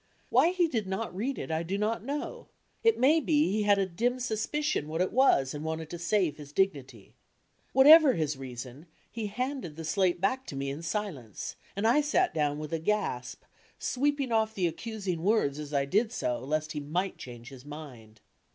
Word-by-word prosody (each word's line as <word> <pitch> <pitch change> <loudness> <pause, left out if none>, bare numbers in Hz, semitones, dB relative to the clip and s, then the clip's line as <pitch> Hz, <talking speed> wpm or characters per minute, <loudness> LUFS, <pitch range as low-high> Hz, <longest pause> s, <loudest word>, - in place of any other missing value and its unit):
Why 335 - +5
he 360 -1 +2
did 225 -10 -2
not 190 +1 -3
read 250 +8 -2
it - - -5
I 160 0 0
do 180 +4 -2
not 215 +1 -1
know, 295 - -5 0.4
it 455 -1 +4
may 290 +6 +5
be 300 - +2
he 215 +1 +1
had 205 -1 +4
a 195 - +2
dim 235 +8 -1
suspicion 250 - -1
what 160 +2 -3
it 185 - +1
was 225 - +4
and 150 0 -5
wanted 160 0 -4
to 175 - -6
save 170 -3 +1
his 145 -2 -11
dignity. 140 - -2 0.6
Whatever 290 +1 +8
his 155 -6 -1
reason, 130 +3 -8 0.2
he 225 -2 -4
handed 250 - -4
die 165 - -7
slate 180 +2 +1
back 255 +8 0
to - - -6
me 135 0 -2
in 145 +4 -6
silence, 170 - -4 0.2
and.I 225 +8 +3
sat 350 +5 +1
down 145 -2 0
with 150 +1 -6
a 165 - 0
gasp, 165 -9 -2 0.3
sweeping 280 -1 0
off 220 -1 +1
the 185 - 0
accusing 190 0 -3
words 170 -8 +1
as 150 -1 -7
I 140 -2 +1
did 215 - +1
so 125 - -2
lest 155 +4 -2
he 150 - -3
might 175 +7 -2
change 120 -1 -9
his 130 -3 -12
mind. 130 -8 -11
185 Hz, 195 wpm, -29 LUFS, 150-235 Hz, 0.6 s, Whatever